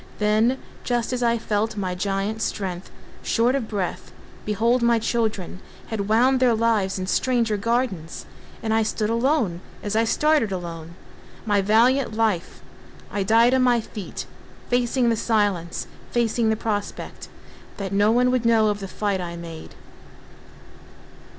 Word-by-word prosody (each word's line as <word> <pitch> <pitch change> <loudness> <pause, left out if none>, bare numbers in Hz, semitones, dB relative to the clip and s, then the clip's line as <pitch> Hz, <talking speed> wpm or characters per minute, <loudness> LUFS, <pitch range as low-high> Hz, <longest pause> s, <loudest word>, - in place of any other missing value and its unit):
Then 215 +4 +2 0.3
just 240 0 -1
as 250 - -2
I 235 -1 +2
felt 215 0 -1
my 185 -2 -2
giant 195 +3 -2
strength 185 -4 -3 0.3
Short 240 +2 +2
of 270 -5 -1
breath, 195 -5 -4 0.3
behold 230 +4 +2
my 235 0 +4
children 220 -5 -2 0.3
Had 210 -2 -3
wound 255 +4 +4
their 250 -3 +4
lives 220 -4 +1
in 185 - -3
stranger 230 +2 +1
gardens— 215 -6 -2 0.4
And 220 -1 0
I 225 - +3
stood 215 0 -1
alone, 230 - +1 0.2
as 205 0 -2
I 225 +1 +3
started 300 -3 +2
alone 170 -2 -6 0.5
My 205 -2 +2
valiant 230 +4 +3
life! 215 -6 -1 0.5
I 205 - -1
died 225 +5 +4
on 260 - +3
my 245 -2 +4
feet, 215 -3 -7 0.5
Facing 245 0 +2
the 230 - +2
silence—facing 220 +3 -1
the 220 - +2
prospect 210 -2 -4 0.5
That 195 -1 -4
no 205 +2 +4
one 250 +2 +3
would 255 -2 +1
know 225 -2 +4
of 205 0 -1
the 195 - -6
fight 200 -1 -2
I 170 -1 -5
made. 165 -2 -9
220 Hz, 145 wpm, -23 LUFS, 195-235 Hz, 0.5 s, my